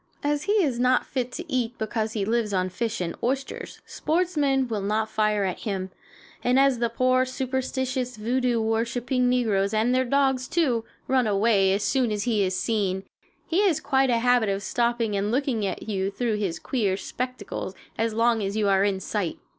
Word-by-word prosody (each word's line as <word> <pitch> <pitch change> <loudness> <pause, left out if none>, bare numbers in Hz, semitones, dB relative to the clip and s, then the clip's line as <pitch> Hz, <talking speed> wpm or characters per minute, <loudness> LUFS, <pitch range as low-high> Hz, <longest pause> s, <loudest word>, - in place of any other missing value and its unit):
As 295 0 0
he 410 - +2
is 295 - +2
not 250 +1 +3
fit 255 -2 -3
to 350 - -5
eat 245 -4 -1
because 220 0 -2
he 205 -3 -1
lives 225 -1 0
on 185 0 +1
fish 225 +2 -3
and 170 -1 -3
oysters, 270 +2 -3
sportsmen 300 -6 0
will 220 -3 -2
not 215 +2 -1
fire 215 -2 +1
at 185 -2 -2
him; 190 -4 -3 0.5
and 250 +1 +3
as 270 -2 +4
the 235 -1 +1
poor, 255 +2 +2
superstitious, 260 -1 -2
voodoo 245 +2 0
worshiping 240 +3 0
negroes, 215 -5 +1
and 225 +3 +2
their 255 0 +3
dogs, 265 0 +1
too, 250 -10 +1 0.2
run 255 -3 +2
away 200 -1 +3
as 200 +2 +1
soon 255 -5 +1
as 210 -1 -1
he 225 -4 +1
is 185 -1 0
seen, 195 -3 0 0.4
he 340 +4 +1
has 330 -6 +2
quite 270 -2 +2
a 240 - +3
habit 245 -2 +3
of 195 0 -2
stopping 235 -1 0
and 200 +1 0
looking 245 -4 0
at - - -5
you 195 -2 -1
through 220 +1 -1
his 190 -6 -2
queer 205 -5 -1
spectacles 245 -5 -5 0.2
as 225 0 0
long 230 0 +2
as 200 +1 -2
you 210 -2 +2
are 195 0 +4
in 200 -2 +1
sight. 190 -2 -2
235 Hz, 190 wpm, -25 LUFS, 205-255 Hz, 0.5 s, as